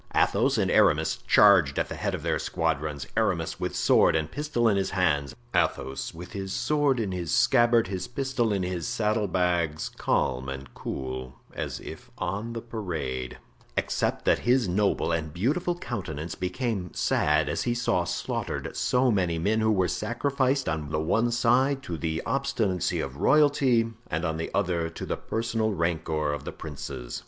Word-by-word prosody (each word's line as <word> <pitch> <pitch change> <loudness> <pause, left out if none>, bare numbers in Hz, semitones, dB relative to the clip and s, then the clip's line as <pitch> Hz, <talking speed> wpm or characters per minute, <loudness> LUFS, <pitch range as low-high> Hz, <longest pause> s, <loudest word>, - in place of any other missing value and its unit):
Athos - - +3
and - - +1
Aramis - - +3
charged 95 -9 +6
at - - +1
the - - -6
head - - -2
of - - -7
their - - 0
squadrons; 70 -2 -2
Aramis 100 -7 0
with - - -3
sword - - +4
and 80 -1 -1
pistol 145 -5 0
in 105 - +3
his 95 -1 0
hands, 75 -8 0 0.2
Athos 65 0 0
with 90 +2 -10
his 95 -2 -5
sword 140 +3 +1
in 105 -4 -1
his 90 -3 -3
scabbard, 120 -1 +4
his 90 -1 -4
pistol 130 -3 -1
in 100 -2 0
his 90 -3 -3
saddle 105 -1 0
bags; 85 -4 0
calm 65 +2 0
and 65 -1 -7
cool 65 -1 -5 0.2
as - - -4
if - - -10
on 105 +6 -3
the 115 - -5
parade, 80 - -4 0.4
except - - -1
that - - +4
his 125 -2 +2
noble 95 -1 +1
and 80 -2 -2
beautiful 160 - 0
countenance 85 - -5
became 95 - -3
sad - - +2
as - - -1
he 120 - 0
saw 120 -7 +1
slaughtered 85 0 -3
so 125 0 +2
many 90 -5 +1
men 105 +7 +1
who 110 0 +3
were 95 -4 +2
sacrificed 135 +4 0
on 80 -2 -2
the 75 0 -1
one 115 +10 +1
side 130 +3 +2
to 85 - -4
the 80 0 -2
obstinacy 110 - 0
of 70 0 -4
royalty 135 - +3
and 80 +3 -2
on 80 0 -1
the 80 - -3
other 85 -4 0
to 80 - -7
the - - -2
personal 115 -1 -1
rancor 80 -3 -1
of 75 - -5
the - - -5
princes. 70 -5 -7
95 Hz, 170 wpm, -27 LUFS, 80-120 Hz, 0.4 s, charged